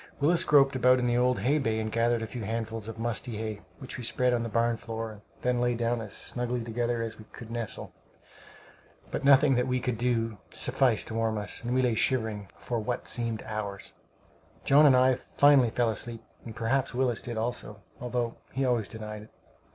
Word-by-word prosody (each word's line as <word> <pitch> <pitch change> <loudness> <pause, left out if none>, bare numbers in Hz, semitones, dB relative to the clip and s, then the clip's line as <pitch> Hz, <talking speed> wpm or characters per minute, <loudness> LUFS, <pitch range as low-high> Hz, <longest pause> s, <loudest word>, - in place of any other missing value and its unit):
Willis 165 +4 +3
groped 140 -5 +5
about 125 0 +5
in 125 - 0
the 120 0 +2
old 125 +1 +2
hay 145 +4 +2
bay 110 -5 0
and 110 0 -3
gathered 115 0 +1
a - - -2
few 120 +2 -7
handfuls 115 0 -4
of 115 0 -7
musty 115 0 -3
hay, 110 -2 -4 0.2
which 130 - -8
we - - -6
spread 125 +2 +2
on 120 - +1
the 115 - -3
barn 115 +1 +1
floor, 115 0 -5
and 105 -1 -13 0.2
then 125 -1 +1
lay 120 0 +1
down 120 0 0
as 110 -3 -8
snugly 125 -1 -3
together 120 0 -1
as 115 -1 -6
we 110 - -11
could 115 +1 -11
nestle, 115 -2 -5 1.2
but - - -3
nothing 140 0 +6
that 125 0 +1
we 125 0 +1
could 120 -2 -2
do 115 -4 0
sufficed 125 -5 +2
to - - -5
warm 115 -1 0
us, 105 +3 -4
and 120 +1 -1
we 130 - +3
lay 125 -2 +2
shivering 110 -4 0
for 120 -2 -3
what 120 +3 -3
seemed 115 -2 -1
hours. 105 -2 -5 0.7
John 145 +2 +6
and 130 -2 +6
I 130 0 +4 0.2
finally 140 -4 +6
fell 115 0 +1
asleep, 115 +1 -5 0.2
and 115 - -8
perhaps 125 +2 0
Willis 125 -3 +1
did 120 -2 -5
also, 110 -3 -3 0.2
although 120 -1 -2 0.2
he 135 +1 0
always 120 -5 +1
denied 105 -1 -7
it. 105 - -14
120 Hz, 205 wpm, -28 LUFS, 110-125 Hz, 1.2 s, nothing